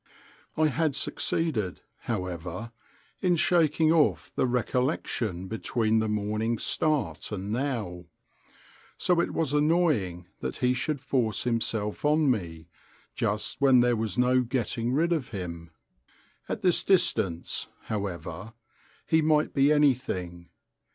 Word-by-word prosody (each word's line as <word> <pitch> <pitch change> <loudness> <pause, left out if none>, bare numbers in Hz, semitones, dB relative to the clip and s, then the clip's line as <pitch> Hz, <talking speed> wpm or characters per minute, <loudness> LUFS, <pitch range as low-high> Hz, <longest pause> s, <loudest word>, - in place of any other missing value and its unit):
I 155 0 +3
had 155 -1 0
succeeded, 125 - -1 0.2
however, 90 +1 -4 0.5
in 180 -2 +3
shaking 160 -2 +3
off 160 -3 +2
the - - +1
recollection 125 - -1
between 110 +1 0
the 110 0 0
morning's 105 +2 -1
start 135 - 0
and 100 0 -4
now; 110 -9 -3 0.9
so 180 -1 +2
it - - -1
was 155 -4 -1
annoying 150 - +1
that - - -4
he 125 0 +1
should 130 +2 -2
force 120 -7 0
himself 110 -3 -1
on 150 -1 +3
me, 85 -7 -4 0.5
just 105 +3 -2
when 130 -3 +6
there 120 0 +3
was 110 -4 -2
no 125 +1 +4
getting 120 -1 -2
rid 165 +6 +2
of 145 -6 -2
him. 85 -7 -6 0.8
At - - -3
this 180 -2 +3
distance, 95 - +1 0.2
however, 100 -1 -5 0.5
he 160 0 +3
might 155 0 +2
be 140 +1 +4
anything. 115 - 0
120 Hz, 125 wpm, -27 LUFS, 100-150 Hz, 0.9 s, when